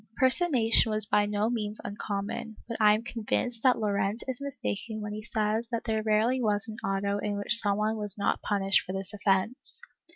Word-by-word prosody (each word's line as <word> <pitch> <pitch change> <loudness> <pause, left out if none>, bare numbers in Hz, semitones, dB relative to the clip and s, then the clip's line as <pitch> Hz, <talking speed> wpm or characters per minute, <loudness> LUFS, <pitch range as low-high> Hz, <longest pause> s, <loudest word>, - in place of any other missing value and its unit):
''^ - - -31
Personation 260 -5 +4
w^as 215 -1 +4
by 210 -2 +2
no 210 +1 0
means 215 -3 -2
uncommon, 205 +1 -5
but 230 - -5
I 210 -1 +6
am 220 - -4
convinced 235 0 -2
that 255 0 +4
Llorente 205 0 -1
is 260 0 -3
mistaken 220 - -4
when 210 0 -5
he 215 - -5
says 220 +1 -1
that 230 -1 -2
there 220 -1 -1
rarely 220 +4 +1
was 210 -1 +1
an 220 0 -7
auto 200 +1 -1
in 205 0 -2
which 205 +3 +5
some 205 -2 0
one 215 +1 0
was 210 -1 -3
not 200 - 0
punished 195 -2 +2
for 185 - -6
this 195 +2 -5
offence. 210 - -1
215 Hz, 200 wpm, -28 LUFS, 205-230 Hz, -, I